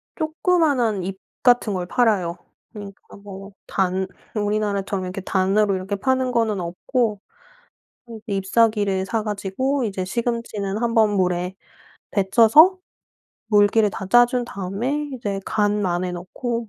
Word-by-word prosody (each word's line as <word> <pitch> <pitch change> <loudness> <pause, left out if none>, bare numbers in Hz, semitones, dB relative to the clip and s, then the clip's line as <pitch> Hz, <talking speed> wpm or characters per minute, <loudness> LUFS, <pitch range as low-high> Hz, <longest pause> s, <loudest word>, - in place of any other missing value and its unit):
조그마한 310 - +1
잎 190 +1 -5 0.2
같은 245 -4 +4
걸 180 -1 -2
팔아요. 190 -6 +1 0.4
그러니까 200 -1 -11
뭐 200 0 -10 0.2
단 190 0 0 0.3
우리나라처럼 205 -2 -1
이렇게 185 +2 -5
단으로 195 +2 +1
이렇게 190 +2 -3
파는 260 +4 0
거는 225 -4 0
없고 210 +5 -2 1.1
이 200 -2 -2
잎사귀를 200 -1 +1
사 225 0 -1
가지고 215 +6 -2
이제 195 -4 -3
시금치는 220 -1 -3
1 235 -1 0
번 220 -2 +4
물에 180 0 0 0.6
데쳐서 230 - +5 0.7
물기를 210 0 +4
다 190 - -6
짜 240 +5 +6
준 245 0 -2
다음에 235 +9 -3
이제 205 -6 -4
간 205 -1 0
안에 180 0 -1
넣고 230 +6 -4
205 Hz, 270 characters per minute, -22 LUFS, 190-235 Hz, 1.1 s, 짜